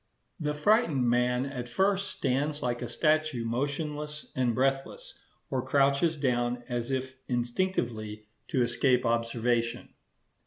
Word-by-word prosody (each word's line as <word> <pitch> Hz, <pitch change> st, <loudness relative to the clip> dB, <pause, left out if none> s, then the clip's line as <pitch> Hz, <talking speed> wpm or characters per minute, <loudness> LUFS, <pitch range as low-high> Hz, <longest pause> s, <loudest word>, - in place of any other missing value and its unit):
The 150 Hz, -2 st, -1 dB
frightened 155 Hz, -, +3 dB
man 125 Hz, +1 st, +2 dB
at 125 Hz, -3 st, -5 dB
first 195 Hz, +8 st, +1 dB
stands 145 Hz, +3 st, -1 dB
like 120 Hz, 0 st, -1 dB
a 120 Hz, -, -3 dB
statue 155 Hz, -1 st, +1 dB
motionless 150 Hz, +4 st, -3 dB
and 125 Hz, -3 st, +1 dB
breathless, 135 Hz, -, -1 dB, 0.4 s
or 130 Hz, -2 st, 0 dB
crouches 140 Hz, +4 st, +2 dB
down 120 Hz, -3 st, 0 dB
as 120 Hz, 0 st, -3 dB
if 130 Hz, 0 st, -3 dB
instinctively 120 Hz, -, -2 dB, 0.2 s
to 130 Hz, -, +2 dB
escape 125 Hz, +1 st, +2 dB
observation. 115 Hz, 0 st, 0 dB
130 Hz, 120 wpm, -29 LUFS, 120-150 Hz, 0.4 s, frightened